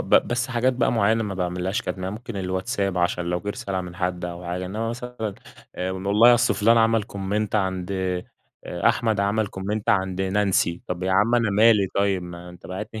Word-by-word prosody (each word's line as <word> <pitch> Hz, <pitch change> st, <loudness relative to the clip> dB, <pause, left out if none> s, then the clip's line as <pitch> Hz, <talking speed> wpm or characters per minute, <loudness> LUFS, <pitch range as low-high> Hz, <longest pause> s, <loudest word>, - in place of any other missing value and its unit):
ب -, -, -5 dB
بس 120 Hz, +1 st, +3 dB
حاجات 125 Hz, +1 st, +1 dB
بقى 120 Hz, -1 st, +1 dB
معينة 110 Hz, 0 st, +2 dB
ما 105 Hz, -3 st, -3 dB
باعملهاش 90 Hz, +1 st, -2 dB
كتم، 95 Hz, -, -4 dB
يعنى 95 Hz, +3 st, -3 dB
ممكن 115 Hz, -1 st, -8 dB
الواتساب 95 Hz, +1 st, -1 dB
عشان 85 Hz, 0 st, 0 dB
لو 90 Hz, 0 st, -1 dB
جه 100 Hz, -, -6 dB
رسالة 95 Hz, -2 st, -3 dB
من 90 Hz, -1 st, -8 dB
حد 90 Hz, -1 st, -2 dB
أو 85 Hz, 0 st, -6 dB
حاجة. 90 Hz, +1 st, -3 dB
إنما 110 Hz, +4 st, -3 dB
مثلًا 120 Hz, -3 st, -5 dB, 0.4 s
آآ، 90 Hz, +1 st, -2 dB
والله 100 Hz, +6 st, +5 dB
أصل 120 Hz, -, +2 dB
فلان 115 Hz, +2 st, +4 dB
عمل 115 Hz, 0 st, +3 dB
Comment 100 Hz, +2 st, -2 dB
عند 95 Hz, -2 st, -1 dB, 0.7 s
أحمد 110 Hz, -3 st, +1 dB
عمل 105 Hz, +2 st, +1 dB
Comment 100 Hz, +2 st, -4 dB
عند 95 Hz, -1 st, +1 dB
نانسي، 95 Hz, -3 st, +1 dB
طب 90 Hz, 0 st, -4 dB
يا 95 Hz, 0 st, 0 dB
عم 105 Hz, +5 st, +3 dB
أنا 115 Hz, -3 st, +2 dB
مالي 105 Hz, 0 st, +5 dB
طيب، 100 Hz, -2 st, +1 dB
ما 90 Hz, 0 st, -9 dB
أنت 90 Hz, -1 st, -12 dB
باعت 95 Hz, +4 st, -5 dB
لي، 110 Hz, -, -4 dB
100 Hz, 200 wpm, -24 LUFS, 90-110 Hz, 0.7 s, والله